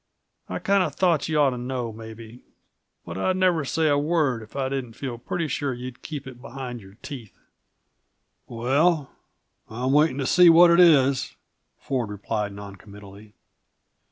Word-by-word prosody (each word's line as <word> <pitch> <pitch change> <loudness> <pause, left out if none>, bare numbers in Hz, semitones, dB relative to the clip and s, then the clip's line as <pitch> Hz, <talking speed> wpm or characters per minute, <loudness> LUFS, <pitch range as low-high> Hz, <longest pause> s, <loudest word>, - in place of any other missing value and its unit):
I - - -3
kinda 195 -4 +1
thought 165 0 +1
you 155 - 0
ought 140 -2 +4
to 125 - -5
know, 125 -2 -4
maybe 110 +2 -11 0.6
but 85 +2 -6
I'd 185 - 0
never 180 -4 +2
say 160 +3 0
a 145 -1 +3
word 145 -6 0
if 110 - -14
I 135 -1 -1
didn't 130 -3 -4
feel 120 -1 -6
pretty 165 +6 -3
sure 140 -2 -2
you'd 125 0 -9
keep 145 -3 -7
it 125 -2 -11
behind 125 -2 -7
your 95 0 -15
teeth." 125 -8 -9 1.1
"Well 135 +6 +1 0.6
I'm 125 +4 -2
waiting 150 -1 +3
to 135 - -2
see 175 +5 +6
what 170 +1 +7
it 170 - +4
is," 140 -6 +4 0.4
Ford 125 -6 -3
replied 105 0 -3
non 100 0 -10
committally. 105 +1 -14
130 Hz, 160 wpm, -24 LUFS, 115-155 Hz, 1.1 s, what